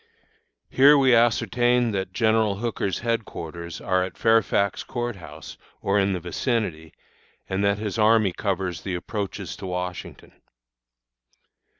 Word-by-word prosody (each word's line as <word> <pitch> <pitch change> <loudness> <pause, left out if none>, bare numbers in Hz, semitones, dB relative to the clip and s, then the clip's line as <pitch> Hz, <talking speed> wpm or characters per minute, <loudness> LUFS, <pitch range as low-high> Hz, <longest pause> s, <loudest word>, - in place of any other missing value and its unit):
Here 145 +3 +6
we 130 -2 +4
ascertained 120 0 +2
that 95 -1 -3
General 110 -1 +2
Hooker's 105 -4 -2
headquarters 85 -8 -4
are 95 -1 +1
at 90 -2 -7
Fairfax 115 -3 +2
Court 120 -3 -4
House, 75 -4 -11 0.2
or 100 +1 +1
in 100 0 +1
the 90 - -2
vicinity, 90 - -2 0.6
and 95 +1 -1
that 100 0 +2
his 105 +1 -4
army 110 -3 +4
covers 95 -4 -2
the 95 -2 -4
approaches 100 -1 -5
to 100 - -7
Washington. 90 0 -6
100 Hz, 125 wpm, -24 LUFS, 90-115 Hz, 0.6 s, Here